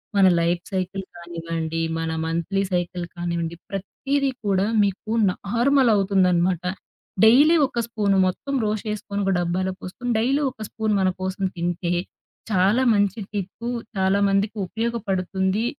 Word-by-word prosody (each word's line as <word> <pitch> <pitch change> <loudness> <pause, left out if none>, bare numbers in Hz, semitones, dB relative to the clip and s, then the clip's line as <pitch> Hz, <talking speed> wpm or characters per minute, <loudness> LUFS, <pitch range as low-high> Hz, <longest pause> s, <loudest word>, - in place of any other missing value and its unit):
మన 195 -1 +6
life 170 +1 0
cycle 190 +1 -2
కానివ్వండి, 165 -1 -4 0.2
మన 165 0 -2
మంథ్లీ 170 +4 -1
సైకిల్ 175 0 -1
కానివ్వండి 170 -1 -3
ప్రతీది 270 +8 -1 0.2
కూడా 195 -1 +2 0.2
మీకు 200 +2 -2 0.2
నార్మల్ 240 +7 +2
అవుతుందన్నమాట. 185 -3 +2 0.6
డైలీ 290 +9 +7
ఒక 240 - -4
స్పూను 205 -4 +1
మొత్తం 275 +9 -3
రోస్ట్ 215 0 -2
చేసుకొని 205 -1 -3
ఒక 195 - +2
డబ్బాలో 185 +2 -1
పోసుకొని, 245 +7 -4
డైలీ 270 +6 +2
ఒక 220 - -28
స్పూన్ 220 -2 -1
మనకోసం 185 +1 -1
తింటే. 175 0 -1 0.6
చాలా 200 +5 +3
మంచి 200 +1 +1
టిప్పు, 205 +4 -4 0.3
చాలామందికి 200 +2 +2
ఉపయోగపడుతుంది, 200 -2 -1
195 Hz, 120 wpm, -23 LUFS, 175-215 Hz, 0.6 s, డైలీ